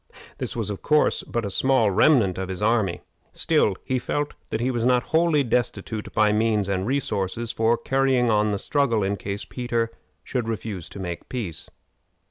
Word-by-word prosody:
This - - -3
was, 110 -3 -2
of 100 - -6
course, 150 0 +3
but 120 -2 -3
a 100 - -3
small 130 -2 +3
remnant 105 - +4
of 95 -1 -4
his 95 +2 -4
army. 105 -6 +1 0.3
Still, 150 -11 +2
he 130 -1 -1
felt 145 +3 -2 0.2
that 110 - -2
he 125 +3 0
was 120 -2 -1
not 125 0 +3
wholly 160 -3 +4
destitute 110 -3 -1
of 105 -1 +2
means 105 -2 +1
and 95 0 -1
resources 115 -4 -1
for 115 +1 +2
carrying 135 -2 +2
on 105 0 +2
the 100 - 0
struggle 120 -2 +1
in 100 +1 0
case 100 +1 -5
Peter 120 -2 -2 0.3
should 125 -3 -3
refuse 105 -5 -4
to - - -9
make 85 -3 -6
peace. 110 -11 -5
115 Hz, 180 wpm, -24 LUFS, 100-125 Hz, 0.3 s, remnant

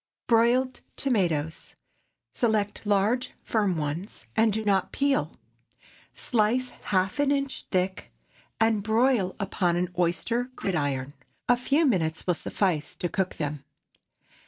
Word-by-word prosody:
BROILED 245 +3 +3 0.2
TOMATOES. 170 - -1 0.6
Select 215 -3 0
large, 210 +5 +1
firm 205 -6 +1
ones, 155 +6 -4
and 220 0 +4
do 220 +1 -2
not 195 -2 +2
peel. 280 0 +1 0.8
Slice 245 +2 +1 0.2
half 190 +5 +1
an 285 -1 +3
inch 275 -1 -1
thick, 185 0 -1 0.5
and 225 -2 +3
broil 220 -2 +2
upon 185 -3 0
an 175 0 0
oyster 210 +8 +1
gridiron. 145 -6 -2 0.3
A 245 - +5
few 275 +6 +2
minutes 165 - 0
will 180 - +3
suffice 170 -2 -1
to 175 - -3
cook 190 0 -1
them. 145 -2 -4
205 Hz, 120 wpm, -27 LUFS, 175-240 Hz, 0.8 s, A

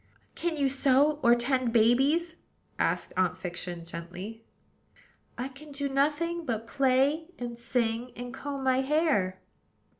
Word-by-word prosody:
"Can 335 -2 -2
you 280 -1 +2
sew, 275 +2 +3
or 235 0 +6
tend 250 0 +1
babies?" 270 +9 +3 0.4
asked - - 0
Aunt 185 -1 +1
Fiction 175 -1 -5
gently. 180 +7 -8 0.9
"I 250 +2 -2
can 280 +3 -13
do 280 0 -2
nothing 300 +5 0
but 230 -6 -3
play 275 +5 +2
and 240 -1 -5
sing, 235 0 -1
and 245 +1 -7
comb 275 0 -5
my 260 -1 +3
hair." 265 - +1
260 Hz, 130 wpm, -29 LUFS, 225-285 Hz, 0.9 s, or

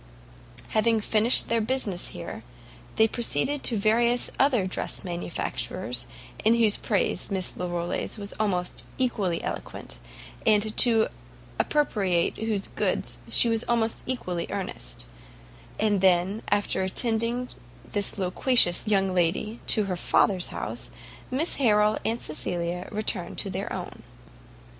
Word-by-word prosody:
Having 220 0 +2
finished 220 +3 +4
their 230 0 +1
business 215 -6 0
here, - - -7 0.5
they 220 - +5
proceeded 240 - 0
to 230 - +3
various 235 +4 +2
other 255 -8 +3
dress 185 - -3
manufacturers, 175 -2 -3 0.4
in 225 +2 +4
whose 225 -3 +4
praises 205 -4 0
Miss 190 -2 -1
Larolles 175 +3 -3
was 200 -1 -6
almost 180 -4 -1
equally 205 -9 0
eloquent, - - -6 0.4
and 215 0 +2
to 225 -3 +5 0.5
appropriate 195 - +1
whose 215 -3 -1
goods - - -2
she - - +6
was 225 0 +1
almost 230 -2 0
equally 180 -9 -3
earnest: - - -5 0.7
and 205 -3 +1
then, 190 +3 +3
after 205 -1 0
attending 230 +5 -1 0.4
this 205 0 0
loquacious 185 +1 +2
young 195 -2 +2
lady 185 +6 0
to 215 - +4
her 190 -2 -2
father's 180 +1 +1
house, - - -6 0.4
Mrs 295 +7 +3
Harrel 210 -4 +3
and 230 +1 0
Cecilia 170 +3 -1
returned 215 +1 -3
to - - -1
their - - -4
own. - - -6
210 Hz, 125 wpm, -26 LUFS, 185-230 Hz, 0.7 s, she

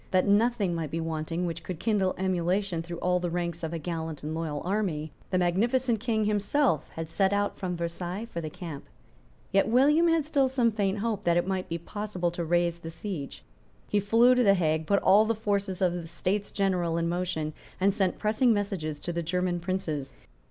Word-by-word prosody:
That 185 -1 +3
nothing 205 -2 +3
might 165 -3 -3
be 165 - -3
wanting 165 +2 -2
which 165 -1 -4
could 180 -4 -6
kindle 200 -5 +1
emulation 185 -1 0
through 170 +1 -6
all 180 +1 +1
the 175 -1 -2
ranks 170 -1 -2
of 160 -1 -3
a 170 - -2
gallant 160 -2 -4
and 155 +1 -3
loyal 160 -3 -3
army, 175 -6 -1 0.2
the 185 - +1
magnificent 225 +7 +2
King 220 -2 0
himself 210 - +1
had 165 0 -6
set 190 +4 +1
out 205 0 0
from 180 -2 -3
Versailles 175 +4 -4
for 170 -7 -5
the 155 - -4
camp. 165 -4 -8 0.7
Yet 195 0 +3
William 290 +8 +4
had 330 -3 +2
still 285 -3 +2
some 250 -3 +2
faint 205 -2 0
hope 210 -1 -2
that 170 0 +3
it 175 - +2
might 190 -1 -2
be 165 - -1
possible 185 0 -3
to 175 0 -3
raise 170 0 +1
the 165 - -7
siege. 165 -3 -6 0.5
He 210 - +2
flew 230 +5 +5
to 250 0 +3
the 200 -2 +6
Hague, 160 -3 0
put 200 -1 +2
all 205 +3 +6
the 230 +1 +1
forces 200 -3 -1
of 180 -1 +3
the 175 -2 -5
States 185 +4 -2
General 180 -4 0
in 170 0 0
motion, 170 -3 -2 0.3
and 195 +1 +3
sent 190 -3 0
pressing 220 +4 +2
messages 195 -8 -1
to 175 - -3
the 170 - -1
German 180 +1 -1
Princes. 160 -7 -3
180 Hz, 205 wpm, -28 LUFS, 170-205 Hz, 0.7 s, the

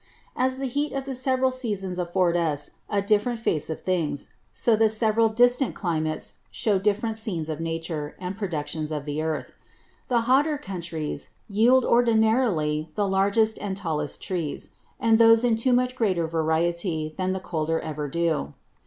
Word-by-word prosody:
As 260 +1 +1
the 270 - -3
Heat 285 +4 -1
of 275 -1 -3
the 270 - -4
several 260 0 +1
Seasons 205 -8 -3
affords 175 0 +1
us 155 -4 -1 0.2
a 200 -1 0
different 215 +3 +1
Face 160 -10 -1
of 160 - -5
Things; 165 -6 -2 0.2
so 230 - +2
the 220 0 +4
several 220 +1 +2
distant 245 +4 +3
Climates 155 -4 -2
shew 210 -5 0
different 215 +3 0
Scenes 175 -8 -3
of 155 -1 -3
Nature, 165 -2 -4
and 185 +1 -5
Productions 160 -5 -3
of 150 -2 -3
the 150 +1 -2
Earth. 155 -5 -3 0.5
The 240 -2 +2
Hotter 280 +6 +3
Countries 170 - -5 0.2
yield 235 +5 +4
ordinarily 220 -10 +2
the 205 -1 +1
largest 200 +3 +2
and 195 -2 -3
tallest 155 -6 -3
Trees; 170 -6 -4 0.3
and 225 0 +4
those 225 0 +7
in 240 -2 +3
too 230 +3 +1
much 250 +1 +2
greater 190 -8 +1
variety 160 0 -1
than 185 0 -1
the 190 - -2
colder 165 -2 -1
ever 150 -1 -4
do. 160 - -1
195 Hz, 160 wpm, -25 LUFS, 160-230 Hz, 0.5 s, those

